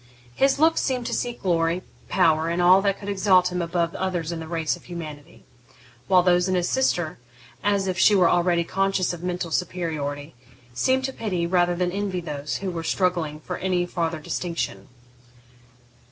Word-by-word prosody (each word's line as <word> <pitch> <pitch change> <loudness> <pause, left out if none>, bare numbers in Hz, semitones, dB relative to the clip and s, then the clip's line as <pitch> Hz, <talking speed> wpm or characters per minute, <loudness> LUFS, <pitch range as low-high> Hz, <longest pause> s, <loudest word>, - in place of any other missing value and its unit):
His 275 - +2
looks 320 +2 +3
seemed 250 -3 -1
to - - -3
seek 240 -1 -3
glory, 170 0 +1 0.3
power, 160 -3 +3
all 180 +2 +6
that 195 -1 +1
could 200 - -10
exalt 190 -2 +3
him 180 0 -2
above 170 0 -1
others 180 -3 -2
in 170 - -4
the 160 - -7
race 165 -2 -1
of - - -17
humanity; 160 -2 -9 0.6
while 180 +2 +5
those 180 0 +3
of 185 - +1
his 175 -1 +1
sister, 175 - 0 0.4
as 200 -1 +1
if 185 -1 -2
she 205 - +6
were 180 -3 +5
already 175 -1 +2
conscious 195 0 0
of 170 - -8
mental 175 -1 -3
superiority, 155 -5 -3 0.4
seemed 260 - +1
to 265 - -3
pity, 185 -8 -2
rather 175 0 +2
than 180 0 0
envy, 195 -1 -2
those 150 -3 -4
who 185 - -1
were 165 -2 -4
struggling 165 -4 -1
for 180 +3 -5
any 180 -1 0
farther 165 -2 -2
distinction. 155 - -4
175 Hz, 175 wpm, -24 LUFS, 165-190 Hz, 0.6 s, all